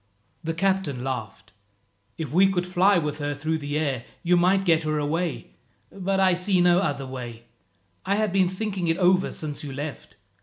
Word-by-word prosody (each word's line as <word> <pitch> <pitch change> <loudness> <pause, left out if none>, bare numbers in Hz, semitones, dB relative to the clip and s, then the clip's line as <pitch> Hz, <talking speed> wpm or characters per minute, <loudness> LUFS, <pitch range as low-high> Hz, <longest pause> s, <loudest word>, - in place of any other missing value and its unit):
The 165 0 -2
captain 190 -8 0
laughed. 125 -5 -5 0.7
"If 155 -5 -4
we 190 +3 +5
could 180 -2 0
fly 185 +2 +3
with 150 -2 -2
her 145 0 -2
through 155 +3 -2
the 145 0 -3
air, 140 -6 -1 0.2
you 180 +1 +4
might 185 +2 +3
get 165 -2 +4
her 155 -1 -1
away, 150 - -2 0.4
but 195 0 -1
I 190 -1 +4
see 180 +1 +1
no 175 0 +5
other 140 -7 -1
way. 120 -3 -7 0.6
I 195 +2 +1
have 215 -2 0
been 190 -2 +3
thinking 190 -2 -3
it 165 +1 +1
over 185 +1 +3
since 150 -2 -5
you 145 - -6
left. 135 -6 -7
170 Hz, 185 wpm, -25 LUFS, 145-185 Hz, 0.7 s, we